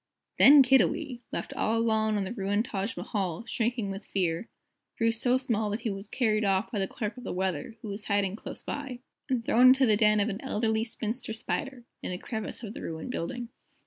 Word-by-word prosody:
Then 280 0 +9
Kiddiwee, 265 0 +2
left - - -4
all 225 +1 0
alone 220 -2 +2
on 200 - 0
the 195 - -4
ruined 205 0 0
Taj 200 -2 -3
Mahal, 190 -1 -3
shrinking 235 -4 -1
with 195 +2 -6
fear, 180 0 -1 0.5
grew 230 0 +3
so 245 +3 +2
small 230 -5 0
that 210 +3 -3
he 225 -3 -1
was 195 +1 -7
carried 215 -4 +1
off 195 0 +1
by 210 - -2
the 195 - 0
Clerk 220 +2 -4
of 250 - -9
the - - -4
Weather, 185 +1 -2
who 215 - -5
was 200 +1 -5
hiding 200 -1 +1
close - - -8
by, 270 -4 -5 0.3
and 245 -3 0
thrown 250 +2 +6
into 265 +1 +6
the 215 -3 +4
den 215 -1 +4
of 205 - +2
an 205 +2 -4
Elderly 220 -3 0
Spinster 225 0 -4
Spider, 260 +3 -3 0.2
in - - -4
a 180 - -3
crevice 220 +4 -5
of 215 -1 -6
the - - -8
ruined 160 +8 -5
building. 240 +4 -4
220 Hz, 210 wpm, -28 LUFS, 200-245 Hz, 0.5 s, Then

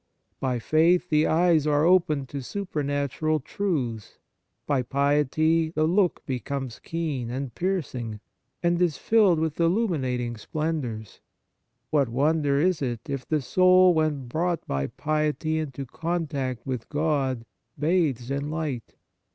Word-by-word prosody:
By 130 -2 0
faith 165 +8 +3
the 150 0 +4
eyes 165 -2 +3
are 150 +1 +3
opened 160 -6 +3
to 140 - -5
supernatural 150 -2 -2
truths; 130 - -3 0.5
by 140 -3 +1
piety 150 +5 +2
the 155 -1 0
look 180 +2 +1
becomes 130 -1 -4
keen 155 -8 -3
and 130 0 -4
piercing, 130 - -3 0.4
and 175 0 +2
is 170 -5 +2
filled 210 -6 +4
with 160 0 -2
illuminating 145 - 0
splendours. 130 -5 -4 0.7
What 140 -5 +2
wonder 145 +2 +2
is 180 +1 +2
it, 120 -4 -2
if 135 -2 -4
the 155 -3 0
soul, 185 +4 +5
when 155 -5 0
brought 170 +6 -1
by 70 0 -1
piety 155 +1 -1
into 140 -3 -5
contact 140 -5 -3
with 125 -4 -4
God, 140 -6 0 0.3
bathes 150 -6 +1
in 140 +1 -2
light 150 -7 -4
150 Hz, 125 wpm, -26 LUFS, 130-165 Hz, 0.7 s, soul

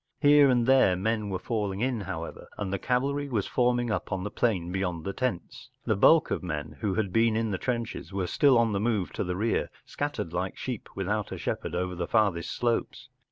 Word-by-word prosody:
Here 145 -1 +6
and 120 -2 +3
there 130 -8 +5
men 105 +2 -1
were 95 - -1
falling 100 0 -2
in, 125 -3 0
however, 95 - -6
and 100 -2 -3
the 100 - -1
cavalry 140 +5 0
was 110 -6 0
forming 120 -1 +1
up 105 - -3
on 95 -2 -2
the 105 - -4
plain 90 -8 0
beyond 90 -4 -2
the 100 - -3
terns. 115 -10 -4 0.2
The - - +2
bulk 160 +11 +5
of - - -1
men 80 -4 -5
who 105 -4 -1
had 100 -4 -1
been 115 -1 +3
in 115 -1 0
the 95 - -2
trenches 120 -5 -3
were 95 -1 -1
still 135 - +4
on 115 -1 +3
the 100 - 0
move 105 -4 0
to - - -2
the 90 0 -3
rear, 110 +4 0 0.2
scattered 85 - -4
like 90 +2 -2
sheep 125 -5 -5
without 100 +2 -2
a - - -4
shepherd - - -3
over 90 +1 -1
the 85 -1 -3
farther 100 -6 +2
slopes. 120 +5 -2
105 Hz, 215 wpm, -28 LUFS, 95-120 Hz, 0.2 s, Here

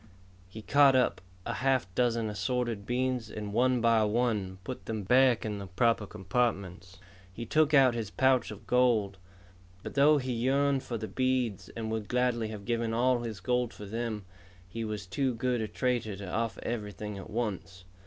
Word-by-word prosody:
He 110 +3 -10
caught 140 +1 +5
up 125 -7 +2 0.2
a - - -2
half 135 -1 +2
dozen 115 0 +1
assorted 105 +1 -2
beads 125 -2 -1
and 105 -1 -6
one 125 +1 +2
by 115 -1 +4
one 105 -4 0
put 125 +6 -7
them 110 -2 -3
back 125 +3 +4
in 105 -2 -3
the 100 - -7
proper 110 +3 +1
compartments. 95 -3 -2 0.3
He 115 +5 -7
took 155 +5 +2
out 130 -3 +6
his 115 -4 -3
pouch 130 +2 +2
of 105 0 -10
gold. 110 -6 +2 0.6
But - - -6
though 145 +2 +5
he 130 -2 -2
yearned 135 +3 +1
for 125 -3 -4
the 110 0 -5
beads, 130 -6 -1
and 110 -1 -3
would 110 -2 -3
gladly 125 -2 +1
have 105 -2 -8
given 115 -1 -1
all 125 +1 +3
his 115 -3 -5
gold 125 -2 -1
for 105 - -9
them, 110 -1 -4 0.4
he 115 +5 -5
was 105 -2 -4
too 130 +6 -1
good 125 0 0
a 110 - -2
trader 120 -2 -1
to 100 0 -8
offer 115 +4 -2
everything 105 -2 -4
at - - -10
once. 95 -6 -4
115 Hz, 180 wpm, -30 LUFS, 105-125 Hz, 0.6 s, out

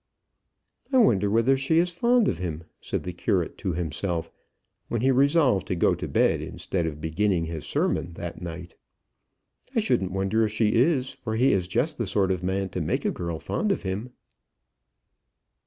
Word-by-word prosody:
"I 265 - +4
wonder 105 - +4
whether 115 +5 +3
she 135 +5 +1
is 175 +1 +3
fond 235 +6 +3
of 85 - -1
him," 85 -3 -4 0.2
said - - -3
the - - -5
curate - - -1
to 95 - -2
himself, 85 +1 -3 0.6
when 115 - -2
he 135 +2 +4
resolved 140 - +3
to 90 - -1
go 85 - +3
to - - -4
bed - - +2
instead 85 -3 -3
of 75 -2 -5
beginning 85 +2 0
his 80 -2 -6
sermon 85 - -1
that 85 +1 -7
night. 85 0 -7 1.0
"I - - +4
shouldn't 95 - +1
wonder 95 +4 +1
if 110 - 0
she 110 -1 +2
is, 130 +1 +2
for 110 -1 -5
he 125 +4 +4
is 90 -3 0
just 125 - -1
the 115 - -1
sort 95 0 +1
of 90 -2 -1
man 95 +1 -1
to 90 - -3
make 80 - -1
a - - +2
girl 85 -2 -4
fond 210 - -1
of 195 - -1
him." 100 +6 -3
100 Hz, 185 wpm, -26 LUFS, 85-130 Hz, 1.0 s, I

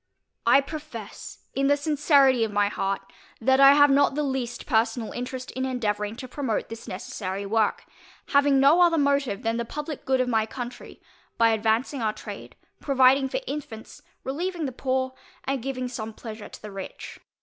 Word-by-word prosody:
I 275 - +7
profess 280 -8 -9
in 275 0 +1
the 285 +1 +4
sincerity 285 -4 +3
of 220 - -1
my 205 0 +2
heart, 195 -1 -2 0.4
that 265 +3 +3
I 275 0 +9
have 290 0 +6
not 275 0 +3
the 300 - 0
least 260 -3 -3
personal 225 0 0
interest 255 +1 -5
in 260 - -3
endeavouring 215 -5 -2
to 255 +2 -8
promote 255 -4 -2
this 225 0 -9
necessary 190 +1 -5
work, 215 +1 0 0.4
having 280 -1 +4
no 285 +6 +6
other 340 -2 +5
motive 280 -7 +1
than 225 0 0
the 235 - -1
publick 295 +4 -6
good 260 -1 +1
of 255 - +1
my 220 -3 +1
country, 245 0 -8 0.3
by 230 0 +5
advancing 225 +5 0
our 215 -1 0
trade, - - -9 0.2
providing 265 -1 +4
for - - -2
infants, 265 - -7 0.2
relieving 335 +5 -3
the 265 - -3
poor, 260 +1 -1 0.3
and 270 -2 -2
giving 255 0 -3
some 225 -3 -6
pleasure 215 -1 -9
to - - -12
the 210 - -7
rich. 195 -1 -8
255 Hz, 175 wpm, -25 LUFS, 225-280 Hz, 0.4 s, I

